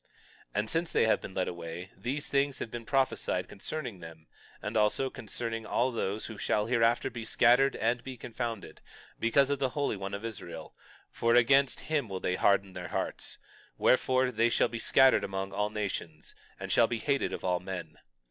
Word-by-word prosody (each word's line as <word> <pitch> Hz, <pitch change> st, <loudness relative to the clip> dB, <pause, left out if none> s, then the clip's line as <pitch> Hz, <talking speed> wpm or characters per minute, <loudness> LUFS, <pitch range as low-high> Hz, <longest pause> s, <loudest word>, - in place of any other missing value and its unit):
22:5 -, -, -38 dB, 0.5 s
And 105 Hz, +2 st, 0 dB
since 165 Hz, +1 st, 0 dB
they -, -, +3 dB
have 110 Hz, -, +3 dB
been 95 Hz, -, -8 dB
led 90 Hz, -, 0 dB
away, 85 Hz, +1 st, -6 dB
these 130 Hz, +9 st, -3 dB
things 140 Hz, -1 st, +1 dB
have 115 Hz, -, -5 dB
been 115 Hz, -1 st, -7 dB
prophesied 130 Hz, -9 st, 0 dB
concerning 120 Hz, 0 st, -5 dB
them, 80 Hz, -1 st, -11 dB, 0.3 s
and -, -, -5 dB
also 110 Hz, +5 st, +2 dB
concerning 115 Hz, -2 st, -4 dB
all 120 Hz, +3 st, +1 dB
those 110 Hz, -2 st, -2 dB
who 110 Hz, -3 st, -8 dB
shall 105 Hz, 0 st, +1 dB
hereafter 115 Hz, 0 st, +2 dB
be 115 Hz, -1 st, -6 dB
scattered 125 Hz, +4 st, +4 dB
and 115 Hz, +2 st, 0 dB
be 130 Hz, -1 st, -7 dB
confounded, 115 Hz, -2 st, -5 dB, 0.4 s
because 135 Hz, +5 st, +3 dB
of 140 Hz, -, 0 dB
the 135 Hz, -2 st, +1 dB
Holy 140 Hz, -2 st, -1 dB
One 95 Hz, 0 st, -4 dB
of 100 Hz, +3 st, -6 dB
Israel; 115 Hz, -3 st, -7 dB, 0.4 s
for 115 Hz, 0 st, +2 dB
against 135 Hz, +3 st, +4 dB
him 150 Hz, -7 st, -1 dB
will 95 Hz, -1 st, -4 dB
they 90 Hz, -, -1 dB
harden 100 Hz, 0 st, +2 dB
their 90 Hz, -1 st, -6 dB
hearts; -, -, -3 dB, 0.4 s
wherefore, 130 Hz, 0 st, +3 dB
they 115 Hz, -1 st, +2 dB
shall -, -, +3 dB
be 115 Hz, -, -5 dB
scattered 135 Hz, +3 st, +5 dB
among 95 Hz, 0 st, -3 dB
all 105 Hz, +1 st, 0 dB
nations 95 Hz, -7 st, -5 dB, 0.3 s
and -, -, -5 dB
shall 115 Hz, -, +5 dB
be 120 Hz, -, -2 dB
hated 140 Hz, +5 st, 0 dB
of -, -, -5 dB
all 90 Hz, -1 st, +1 dB
men. 90 Hz, -4 st, -7 dB
115 Hz, 190 wpm, -30 LUFS, 95-130 Hz, 0.5 s, scattered